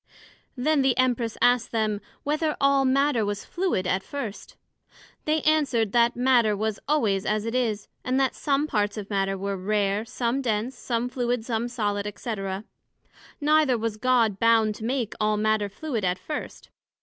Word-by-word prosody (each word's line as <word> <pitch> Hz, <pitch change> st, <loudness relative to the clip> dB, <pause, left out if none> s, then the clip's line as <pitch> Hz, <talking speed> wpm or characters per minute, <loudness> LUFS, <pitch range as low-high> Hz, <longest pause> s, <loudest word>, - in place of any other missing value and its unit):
Then 290 Hz, +3 st, +2 dB
the 265 Hz, -2 st, +2 dB
Empress 245 Hz, -3 st, +1 dB
asked 245 Hz, -2 st, +3 dB
them, 215 Hz, -2 st, 0 dB, 0.2 s
Whether 305 Hz, +1 st, 0 dB
all 275 Hz, -1 st, +3 dB
Matter 265 Hz, -2 st, +2 dB
was 205 Hz, 0 st, -3 dB
fluid 350 Hz, -, -1 dB
at 185 Hz, +1 st, +1 dB
first? 230 Hz, -4 st, -7 dB, 0.7 s
They 310 Hz, 0 st, +1 dB
answered, 275 Hz, -9 st, +2 dB
That 235 Hz, +1 st, +3 dB
Matter 240 Hz, -4 st, +3 dB
was 215 Hz, 0 st, -2 dB
always 220 Hz, -10 st, +1 dB
as 215 Hz, 0 st, -1 dB
it 230 Hz, -, -3 dB
is, 225 Hz, -5 st, -1 dB, 0.2 s
and 255 Hz, +1 st, 0 dB
that 265 Hz, -1 st, +2 dB
some 285 Hz, 0 st, 0 dB
parts 210 Hz, -6 st, -1 dB
of 205 Hz, 0 st, -6 dB
Matter 195 Hz, -1 st, 0 dB
were 200 Hz, +1 st, -2 dB
rare, 200 Hz, +1 st, 0 dB
some 245 Hz, +2 st, -2 dB
dense, 230 Hz, +1 st, -1 dB
some 240 Hz, 0 st, -2 dB
fluid, 245 Hz, -2 st, -2 dB
some 235 Hz, -1 st, -1 dB
solid, 210 Hz, -4 st, -2 dB
&c. 230 Hz, -3 st, -3 dB, 1.0 s
Neither 300 Hz, -4 st, +3 dB
was 225 Hz, -1 st, -3 dB
God 230 Hz, -4 st, +2 dB
bound 225 Hz, -2 st, +4 dB
to 220 Hz, -, -7 dB
make 245 Hz, -2 st, -1 dB
all 215 Hz, 0 st, +2 dB
Matter 215 Hz, -1 st, +1 dB
fluid 235 Hz, +1 st, -4 dB
at 180 Hz, 0 st, +1 dB
first. 295 Hz, +11 st, -7 dB
230 Hz, 165 wpm, -25 LUFS, 210-265 Hz, 1.0 s, bound